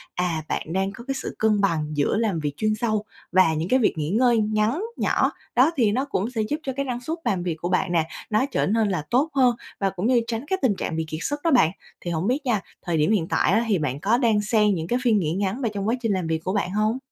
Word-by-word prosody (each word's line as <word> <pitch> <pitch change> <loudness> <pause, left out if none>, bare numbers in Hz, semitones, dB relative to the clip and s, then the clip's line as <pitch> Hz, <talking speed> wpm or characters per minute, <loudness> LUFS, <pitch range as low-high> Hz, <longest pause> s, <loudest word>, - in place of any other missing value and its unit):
à, 175 -3 -1
bạn 160 - -3
đang 195 +1 0
có 235 - -11
cái 270 - -1
sự - - -5
cân 215 -2 +2
bằng 165 -6 +1
giữa 145 +8 +1
làm 215 -7 0
việc 145 -2 -2
chuyên 215 0 +1
sâu 215 -2 -1 0.3
và 180 -3 +4
những 160 +3 -2
cái 260 - +4
việc 225 - +2
nghỉ 150 -1 -2
ngơi 235 +4 +3
ngắn, 215 - +1
nhỏ. - - +1 0.2
Đó, 260 +6 +5
thì 225 -6 +3
nó 260 +6 0
cũng 225 -6 -2
sẽ 235 -3 -2
giúp 250 +8 -1
cho 265 - -3
cái 275 0 -1
năng 245 -2 -3
suất 320 +6 -3
làm 190 -6 0
việc 175 -3 -2
của 170 +2 -4
bạn 185 0 +1
nè, 165 -2 +1 0.2
nó 215 +4 +2
trở - - +1
nên 215 +1 +2
là 180 -6 -1
tốt 275 +6 +2
hơn 255 -3 +4 0.2
và 195 - +1
cũng 190 +2 -2
như 245 -1 +4
tránh 230 +2 -3
cái 380 +3 -1
tình 240 -7 +2
trạng 165 - -3
bị 160 0 -1
kiệt 155 0 -5
sức 290 0 -2
đó 335 - +2
bạn. 240 - +5 0.3
Thì 175 - -4
hổng 165 +3 -1
biết 270 +5 0
nha, 225 -6 +1 0.2
thời 170 -3 -1
điểm 155 +6 +2
hiện 185 -7 +1
tại - - +2
á 220 +4 +3
thì 210 -4 +2
bạn 140 -3 -2
có 210 +8 +2
đan 225 -5 +2
xen 210 -1 +2
những 165 -1 -4
cái 245 +5 0
phiên 225 -4 +3
nghỉ 160 -4 -1
ngắn 200 +6 -2
vào 235 - 0
trong 200 0 -3
quá 230 - +2
trình 225 -3 0
làm 185 -3 -1
việc 160 0 0
của 185 - -2
bạn 200 -3 -1
hông? 215 +4 +1
210 Hz, 285 wpm, -24 LUFS, 175-240 Hz, 0.3 s, Đó